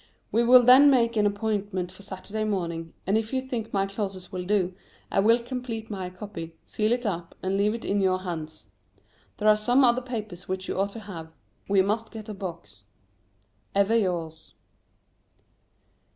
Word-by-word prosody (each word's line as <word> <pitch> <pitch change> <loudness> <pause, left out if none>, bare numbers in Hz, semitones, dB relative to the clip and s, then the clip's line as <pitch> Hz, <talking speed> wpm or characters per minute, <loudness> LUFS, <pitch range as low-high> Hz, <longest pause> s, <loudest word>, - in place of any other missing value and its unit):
We 230 - +3
will 250 +1 +8
then 260 +4 +8
make 235 -4 +3
an 210 -1 +4
appointment 205 -3 -2
for 185 - -13
Saturday 205 +2 -5
morning, 170 -6 -3
and 205 +4 +3
if 220 0 -5
you 265 - +1
think 245 -4 -4
my 195 -1 +1
clauses 195 -2 -5
will 180 -1 -4
do, 190 -2 +1 0.4
I - - +2
will 225 +4 +5
complete 240 -2 -5
my 190 -3 -4
copy, 180 -3 -8
seal 215 +1 0
it 245 0 0
up, 170 -4 -3
and 190 +1 0
leave 205 +2 +2
it 230 - -7
in 200 0 +1
your 185 -1 +2
hands. 160 -4 -6 0.7
There 215 - 0
are 215 - +8
some 245 +6 +3
other 245 0 +4
papers 215 -7 -6
which 185 0 -3
you - - -2
ought 200 +1 +1
to 225 - -7
have. 165 -6 -8 0.4
We 195 -1 +4
must 220 +3 -1
get 220 -1 -9
a - - -4
box. 170 - -8 0.9
Ever 200 +3 +3
yours. 170 -7 -2
205 Hz, 180 wpm, -26 LUFS, 185-225 Hz, 0.9 s, will